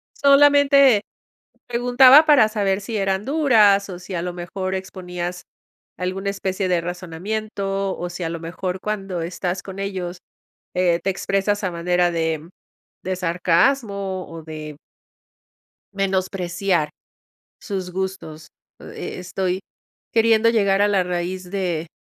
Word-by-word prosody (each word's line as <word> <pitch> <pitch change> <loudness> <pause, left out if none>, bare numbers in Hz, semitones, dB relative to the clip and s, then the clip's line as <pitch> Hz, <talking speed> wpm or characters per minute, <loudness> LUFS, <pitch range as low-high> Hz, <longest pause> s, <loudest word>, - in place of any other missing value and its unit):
Solamente 280 -4 +5 0.7
preguntaba 250 +5 +6
para 275 -8 +6
saber 200 -2 0
si 220 +2 -5
eran 195 0 0
duras, 220 -10 +4
o 180 -2 -7
si 185 +1 -8
a 170 - -2
lo 180 0 -3
mejor 185 +2 -4
exponías 180 -2 -5 0.5
alguna 190 +2 -2
especie 190 -1 -2
de 175 -2 +2
razonamiento, 195 +3 -3
o 175 0 -5
si 175 +1 -7
a - - -1
lo 165 0 -5
mejor 180 +2 -4
cuando 195 -5 -3
estás 180 +1 -3
con 190 0 -9
ellos, 185 -3 -4 0.6
eh, 175 -2 +2
te 195 - 0
expresas 195 +2 -1
a 185 - 0
manera 175 +1 +1
de 160 -1 -2 0.6
de 185 0 -1
sarcasmo 190 +3 0
o 165 -1 -9
de 155 -2 -8 1.2
menospreciar 185 -3 -1 0.7
sus 190 -4 -4
gustos. 190 -4 -5 0.3
E - - -7
e - - -8
estoy 185 +1 -2 0.5
queriendo 225 0 +4
llegar 200 -3 +2
a 205 - +4
la 195 -2 +2
raíz 180 +1 -4
de 175 -4 -2
190 Hz, 130 wpm, -22 LUFS, 175-205 Hz, 1.2 s, preguntaba